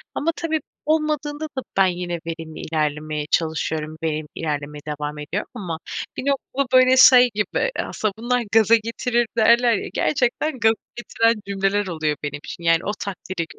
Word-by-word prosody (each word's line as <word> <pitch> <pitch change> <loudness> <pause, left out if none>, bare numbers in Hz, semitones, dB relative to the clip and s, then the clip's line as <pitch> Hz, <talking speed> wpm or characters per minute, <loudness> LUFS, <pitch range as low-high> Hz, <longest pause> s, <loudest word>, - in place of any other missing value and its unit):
Ama 325 +3 0
tabii 320 -2 -1 0.3
olmadığında 305 -1 0
da - - 0 0.2
ben 195 - +6
yine 175 -1 -3
verimli 165 -1 -6
ilerlemeye 150 -1 -2
çalışıyorum, 160 -1 -1
verimli 155 -1 -2
ilerlemeye 150 -1 -4
devam 150 0 -4
ediyorum 155 +8 -4
ama 170 -5 -5 0.4
bir - - -4
noktada 275 -1 -1
böyle 255 0 +5
şey 250 -1 +8
gibi 210 - 0
aslında 215 -2 -2
bunlar 245 +2 0
gaza 225 0 +6
getirir 230 +1 0
derler 235 +2 +5
ya 200 - -2
gerçekten 265 +1 0
gaza 220 0 +5 0.2
getiren 230 -2 +1
cümleler 200 +1 0
oluyor 155 -4 -1
benim 145 0 -4
için 170 - -8
yani 165 0 +4
o 205 - 0
takdire. 185 -3 -4
200 Hz, 155 wpm, -22 LUFS, 160-245 Hz, 0.4 s, şey